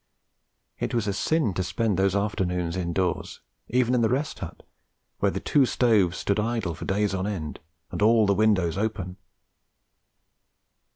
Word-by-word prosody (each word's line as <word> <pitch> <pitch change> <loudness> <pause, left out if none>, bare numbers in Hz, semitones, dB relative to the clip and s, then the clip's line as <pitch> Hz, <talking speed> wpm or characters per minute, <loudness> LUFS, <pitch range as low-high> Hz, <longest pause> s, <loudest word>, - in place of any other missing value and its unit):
It - - -2
was 115 -3 +1
a 100 - 0
sin 150 - +1
to 95 - -1
spend 110 +2 0
those 95 +1 +2
afternoons 90 -4 -1
indoors, 90 0 -2 0.3
even 125 0 +2
in 125 - +3
the 110 - +3
Rest 140 +4 -1
Hut, - - -8 0.6
where - - +3
the - - -3
two 140 -3 +3
stoves 105 -9 +2
stood 100 +1 0
idle 110 -5 -1
for 80 - -8
days 100 0 0
on 95 +1 -1
end, 80 -8 -4 0.3
and - - -4
all 110 +1 +5
the 100 - +3
windows 100 -4 +2
open. 95 -4 -3
100 Hz, 160 wpm, -26 LUFS, 90-115 Hz, 0.6 s, all